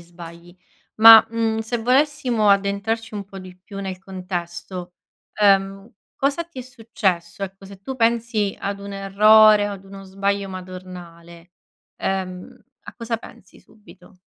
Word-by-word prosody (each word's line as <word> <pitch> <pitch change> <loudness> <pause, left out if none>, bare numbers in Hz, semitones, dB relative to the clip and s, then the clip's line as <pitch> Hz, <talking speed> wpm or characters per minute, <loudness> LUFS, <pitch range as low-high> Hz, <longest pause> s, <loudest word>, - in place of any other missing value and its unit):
sbagli 170 +1 -13 0.4
ma, 225 0 +9
mhmm, 225 -1 -1
se 225 +2 -3
volessimo 250 -3 +1
addentrarci 200 +3 -1
un 200 - -5
po' 195 0 -11
di 185 -1 -12
più 195 +2 -10
nel 190 -2 -6
contesto, 180 -1 -7 0.4
ehm, 195 0 +1 0.2
cosa 280 +5 -1
ti 335 -6 -10
è - - -7
successo? 200 -8 -3
Ecco, 195 0 -7
se 195 0 -13
tu 265 +6 -7
pensi 230 -3 0
ad 200 0 -5
un 200 0 -9
errore 210 +2 +5
o - - -5
ad 195 -1 -10
uno 195 0 -12
sbaglio 195 +1 -2
madornale, 180 -2 -11 0.5
ehm, 185 -1 -4 0.3
a - - -12
cosa 230 -1 -4
pensi 195 -3 -16
subito? 205 -4 -20
200 Hz, 145 wpm, -21 LUFS, 185-225 Hz, 0.5 s, ma